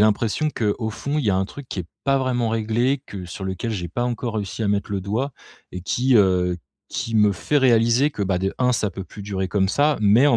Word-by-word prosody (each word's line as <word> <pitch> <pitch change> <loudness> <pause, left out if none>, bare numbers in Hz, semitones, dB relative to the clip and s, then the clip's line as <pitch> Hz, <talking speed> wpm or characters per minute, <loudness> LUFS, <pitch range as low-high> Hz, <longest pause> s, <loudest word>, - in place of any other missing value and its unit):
l'impression 110 +7 +2
qu'au 110 0 -1
fond 140 +7 -2
il 145 - -1
y 100 - +4
a 95 - +2
un 95 - +1
truc 140 +6 -10
qui - - -5
est 85 - -7 0.2
pas 135 0 +3
vraiment 125 -3 0
réglé, 115 +5 +1
que 95 -3 -7
sur 95 +2 -7
lequel 95 +4 -3
j'ai 90 -5 -3
pas 120 +8 -2
encore 120 -1 -2
réussi 105 +1 -3
à 100 - +1
mettre 100 0 0
le 100 - -1
doigt 110 +9 -2 0.4
et 90 - -5
qui, 125 +7 +2
heu, 90 -3 +3 0.3
qui 115 - -4
me 105 -1 +5
fait 145 +9 -1
réaliser 120 +2 +4
que, 105 - -4
bah, 95 -1 +1
de 95 +1 -1
1, 125 0 +3
ça 105 -4 0
peut 95 +1 -7
plus 100 - -10
durer 95 -1 -2
comme 95 -1 +1
ça, 145 +6 +3
mais 110 +6 +5
en 140 - +5
110 Hz, 250 wpm, -23 LUFS, 95-125 Hz, 0.4 s, me